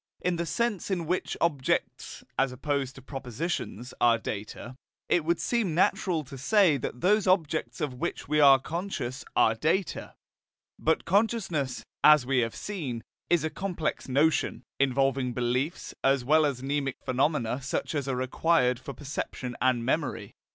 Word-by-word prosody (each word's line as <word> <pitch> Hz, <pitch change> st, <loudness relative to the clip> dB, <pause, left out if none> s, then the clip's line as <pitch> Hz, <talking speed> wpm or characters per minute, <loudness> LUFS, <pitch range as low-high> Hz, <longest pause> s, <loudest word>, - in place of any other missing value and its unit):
In 180 Hz, -1 st, 0 dB
the 170 Hz, 0 st, -2 dB
sense 220 Hz, +3 st, -1 dB
in 180 Hz, -4 st, -1 dB
which 180 Hz, +3 st, -2 dB
objects 145 Hz, -6 st, -1 dB
(as 135 Hz, -1 st, +1 dB
opposed 135 Hz, 0 st, -2 dB
to 135 Hz, -, -12 dB
propositions) 135 Hz, -, -4 dB
are 120 Hz, -1 st, +5 dB
data, 110 Hz, +3 st, -6 dB, 0.3 s
it 175 Hz, -, +2 dB
would 170 Hz, +2 st, +1 dB
seem 220 Hz, -9 st, 0 dB
natural 175 Hz, -2 st, +2 dB
to 135 Hz, -1 st, -10 dB
say 185 Hz, -, +4 dB
that 125 Hz, -1 st, -5 dB
those 205 Hz, +1 st, +3 dB
objects 155 Hz, -9 st, +1 dB
of 145 Hz, -4 st, -1 dB
which 125 Hz, -, -4 dB
we 150 Hz, +1 st, +2 dB
are 140 Hz, -2 st, +8 dB
conscious 145 Hz, -4 st, -4 dB
are 110 Hz, -, +5 dB
data. 160 Hz, -, -1 dB, 0.6 s
But 160 Hz, +1 st, +1 dB
consciousness, 190 Hz, -, 0 dB, 0.2 s
as 150 Hz, -4 st, +7 dB
we 130 Hz, 0 st, +2 dB
have 115 Hz, -2 st, -1 dB
seen, 140 Hz, -, -5 dB, 0.3 s
is 175 Hz, -3 st, +3 dB
a 160 Hz, -, -1 dB
complex 175 Hz, -8 st, -3 dB
notion, 145 Hz, +4 st, +1 dB, 0.2 s
involving 135 Hz, -1 st, +1 dB
beliefs, 125 Hz, +6 st, -1 dB
as 135 Hz, -2 st, +2 dB
well 155 Hz, +2 st, +4 dB
as 130 Hz, -3 st, -4 dB
mnemic 140 Hz, -1 st, -1 dB
phenomena 130 Hz, -1 st, 0 dB
such 135 Hz, +4 st, -3 dB
as 145 Hz, -3 st, -2 dB
are 135 Hz, -, 0 dB
required 130 Hz, 0 st, +2 dB
for 135 Hz, +2 st, -8 dB
perception 135 Hz, -3 st, -5 dB
and 125 Hz, -2 st, +2 dB
memory. 145 Hz, +2 st, -1 dB
140 Hz, 155 wpm, -28 LUFS, 130-170 Hz, 0.6 s, are